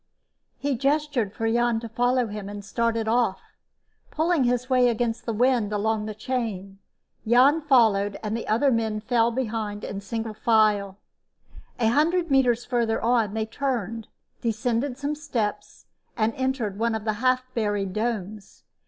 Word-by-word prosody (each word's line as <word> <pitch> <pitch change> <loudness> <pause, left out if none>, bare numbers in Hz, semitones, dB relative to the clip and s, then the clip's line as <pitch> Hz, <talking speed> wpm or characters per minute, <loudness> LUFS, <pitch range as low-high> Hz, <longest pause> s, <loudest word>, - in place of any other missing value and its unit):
_" - - -51 0.5
He 280 -1 -1
gestured 275 -4 0
for 225 +2 -3
Jan 235 0 +2
to 230 - -6
follow 245 +2 +1
him 210 -2 -6
and 205 -1 -8
started 230 0 -1
off, 225 -4 +1 0.7
pulling 315 -3 +1
his 245 0 0
way 255 -2 +4
against 235 0 -2
the - - +1
wind 235 -1 +2
along 210 +1 -1
the 215 - -5
chain. 210 -5 -4 0.5
Jan 260 +7 +5
followed, 220 -8 +3
and 215 0 -2
the 230 - -5
other 240 +6 +3
men 220 -2 0
fell 230 +1 +2
in 235 - -3
behind 220 -4 -3
in 200 - -5
single 225 +2 -4
file. 210 -3 +2 0.8
A 225 -2 +3
hundred 330 +5 +2
meters 245 -3 +3
farther 235 -3 0
on, 225 -3 +1
they 220 -1 -1
turned, 230 -3 -3 0.3
descended 235 +3 -1
some 285 +1 -2
steps 255 -8 -4 0.3
and 225 0 +1
entered 260 -6 -2
one 230 0 +1
of 220 -1 -5
the 215 - +1
half 255 0 +2
buried 205 -4 -1
domes. 215 -2 -4
230 Hz, 160 wpm, -25 LUFS, 215-250 Hz, 0.8 s, Jan